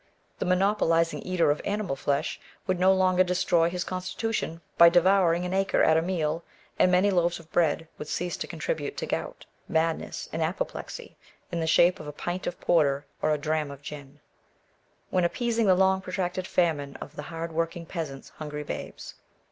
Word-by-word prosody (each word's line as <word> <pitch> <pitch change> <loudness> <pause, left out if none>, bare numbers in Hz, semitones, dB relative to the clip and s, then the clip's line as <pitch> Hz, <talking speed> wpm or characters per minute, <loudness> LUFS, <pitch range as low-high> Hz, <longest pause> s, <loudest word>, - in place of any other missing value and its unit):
The - - -1
monopolising 180 -3 +2
eater 180 -5 +2
of 150 - -2
animal 205 -7 -2
flesh 140 +3 -1 0.3
would 185 -2 0
no 185 +1 +5
longer 185 -1 +4
destroy 175 -2 +2
his 180 0 -3
constitution 185 -1 -3
by 170 0 +9
devouring 175 0 +4
an 180 - -3
acre 195 0 +2
at 160 - +5
a 160 - +4
meal, 165 -2 -1 0.4
and 180 - +5
many 185 +3 +4
loaves 175 -2 +2
of 165 -1 -17
bread 165 -1 +1
would 150 - -6
cease 175 +3 -2
to - - -4
contribute - - -3
to - - -2
gout, - - -4 0.2
madness, 160 0 -1
and 165 - -2
apoplexy, 160 +4 -4 0.3
in 170 - -2
the 160 - -1
shape 175 +3 +4
of 150 - -8
a - - -4
pint 175 +5 -4
of 175 - -4
porter 145 -4 +2 0.2
or - - +2
a 150 - +2
dram 155 0 -1
of 140 0 -10
gin, 145 -1 -9 0.9
when 185 - +2
appeasing 230 +4 +1
the 185 - +6
long 190 0 +3
protracted 185 0 -3
famine 155 -7 0
of - - -9
the - - -5
hard 165 0 -5
working 165 +1 -2
peasant's 155 -6 -6
hungry 150 -1 -6
babes. - - -7
170 Hz, 180 wpm, -27 LUFS, 160-185 Hz, 0.9 s, by